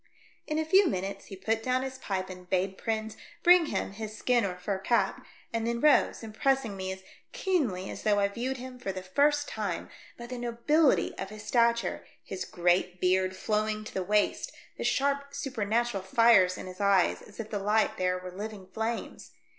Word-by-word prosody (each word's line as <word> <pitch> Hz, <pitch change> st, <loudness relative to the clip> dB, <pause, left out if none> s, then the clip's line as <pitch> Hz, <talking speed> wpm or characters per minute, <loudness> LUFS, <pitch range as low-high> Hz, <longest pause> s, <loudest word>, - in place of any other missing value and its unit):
In 305 Hz, -, -1 dB
a 315 Hz, -, 0 dB
few 380 Hz, +4 st, +5 dB
minutes 195 Hz, -, -3 dB
he 195 Hz, -, -8 dB
put 220 Hz, +4 st, -1 dB
down 255 Hz, +2 st, 0 dB
his 260 Hz, 0 st, -6 dB
pipe 190 Hz, -5 st, -3 dB
and 180 Hz, -1 st, -10 dB
bade 190 Hz, +1 st, 0 dB
Prins 220 Hz, +1 st, -3 dB, 0.3 s
bring 355 Hz, -2 st, +7 dB
him -, -, -2 dB
his 215 Hz, +1 st, -7 dB
skin 245 Hz, -2 st, +2 dB
or 185 Hz, -2 st, -2 dB
fur 190 Hz, +2 st, -3 dB
cap, 235 Hz, +5 st, +1 dB, 0.3 s
and 230 Hz, 0 st, -1 dB
then 235 Hz, 0 st, -1 dB
rose, 300 Hz, -3 st, +4 dB
impressing 225 Hz, 0 st, 0 dB
me 190 Hz, 0 st, -4 dB
as 190 Hz, 0 st, -8 dB, 0.3 s
keenly 310 Hz, -, 0 dB
as -, -, -7 dB
though 210 Hz, -1 st, +2 dB
I 200 Hz, -, +3 dB
viewed 245 Hz, +6 st, -3 dB
him 255 Hz, 0 st, -9 dB
for 195 Hz, -, -3 dB
the 185 Hz, -1 st, -6 dB
first 290 Hz, +9 st, +2 dB
time 205 Hz, -6 st, -4 dB, 0.3 s
by 235 Hz, -, -8 dB
the 250 Hz, 0 st, -6 dB
nobility 245 Hz, +6 st, +2 dB
of -, -, -4 dB
his 215 Hz, 0 st, -9 dB
stature, 235 Hz, -1 st, +2 dB, 0.2 s
his 190 Hz, -, -5 dB
great 180 Hz, +1 st, +1 dB
beard 185 Hz, +1 st, +2 dB
flowing 215 Hz, +2 st, -1 dB
to 215 Hz, -, -9 dB
the 190 Hz, -, -1 dB
waist, 210 Hz, +3 st, +1 dB, 0.2 s
the -, -, -5 dB
sharp 280 Hz, 0 st, 0 dB
supernatural 235 Hz, -5 st, -1 dB
fires 190 Hz, -2 st, +5 dB
in -, -, -7 dB
his 185 Hz, +1 st, -8 dB
eyes 200 Hz, -3 st, +3 dB
as 205 Hz, -, -15 dB
if 220 Hz, -1 st, -6 dB
the 205 Hz, -, -1 dB
light 210 Hz, +2 st, +1 dB
there 180 Hz, 0 st, +1 dB
were 180 Hz, 0 st, -8 dB
living 205 Hz, +1 st, -7 dB
flames. 225 Hz, +1 st, -4 dB
215 Hz, 195 wpm, -29 LUFS, 190-250 Hz, 0.3 s, bring